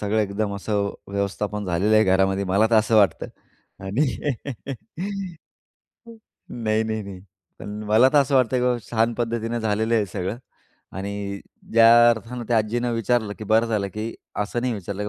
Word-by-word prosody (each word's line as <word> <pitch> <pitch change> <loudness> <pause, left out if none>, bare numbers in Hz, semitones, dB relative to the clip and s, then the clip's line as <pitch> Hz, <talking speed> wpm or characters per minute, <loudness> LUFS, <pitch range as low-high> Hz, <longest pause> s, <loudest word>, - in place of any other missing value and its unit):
सगळं 105 +1 0
एकदम 100 0 -2
असं 100 0 -1 0.2
व्यवस्थापन 100 +1 -2
झालेलं 95 +4 +1
आहे. 110 - +5
घरामध्ये 95 +1 +2
मला 100 +4 +3
का 115 0 +3
असं 110 +1 +2
वाटतं, 100 -2 +3 0.6
आणि. 115 +10 +1 2.4
नाही, 110 -2 0
नाही, 110 -1 -3
नाही. 95 -2 -9 0.4
पण 105 +1 -7
मला 110 +5 +6
का 145 +1 +4
असं 140 0 0
वाटतं 130 -1 +3
की 125 - 0
बाबा, 125 -1 +1
छान 115 0 +2
पद्धतीनं 115 0 -2
झालेलं 110 +1 0
आहे 110 - +3
हे - - -4
सगळं 95 +4 -4 0.6
आणि 100 0 -5 0.3
ज्या 115 +1 +7
अर्थाने 120 +2 -4
त्या 120 - +2
आज्जीनं 120 +3 -1
विचारलं 115 -2 0
की 110 - -6
बरं 110 +3 +3
झालं 105 -3 -1
की, 110 +2 -4 0.2
असं 105 +3 -2
नाही 125 -1 -1
विचारलं 100 +1 -5
की, - - -3
110 Hz, 165 wpm, -23 LUFS, 100-115 Hz, 2.4 s, ज्या